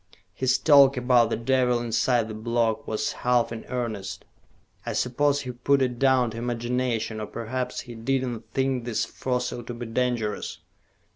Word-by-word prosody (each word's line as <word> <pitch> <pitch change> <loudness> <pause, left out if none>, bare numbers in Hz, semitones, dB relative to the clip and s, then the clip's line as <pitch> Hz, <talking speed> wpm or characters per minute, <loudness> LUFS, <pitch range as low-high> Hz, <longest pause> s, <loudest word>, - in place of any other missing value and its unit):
His 130 0 +2
talk 140 -3 +6
about 125 -2 +4
the - - 0
devil 125 0 +2
inside 120 0 +1
the 110 - -6
block 115 0 -1
was 110 - -1
half 125 -2 +1
in 115 -1 -6
earnest. 115 -6 -4 0.6
I - - -3
suppose 145 +3 +1
he 125 - -5
put 135 +3 +2
it 125 -2 -2
down 130 -3 +3
to 110 - -8
imagination, 120 -1 -2
or 105 - -4
perhaps 125 +2 -4
he 120 - -10
did 130 +4 -1
not 120 -3 -4
think 130 -1 0
this 120 -3 -1
fossil 125 -1 -3
to 120 +1 -7
be 120 +1 -6
dangerous." 115 -2 -2
125 Hz, 165 wpm, -26 LUFS, 115-130 Hz, 0.6 s, talk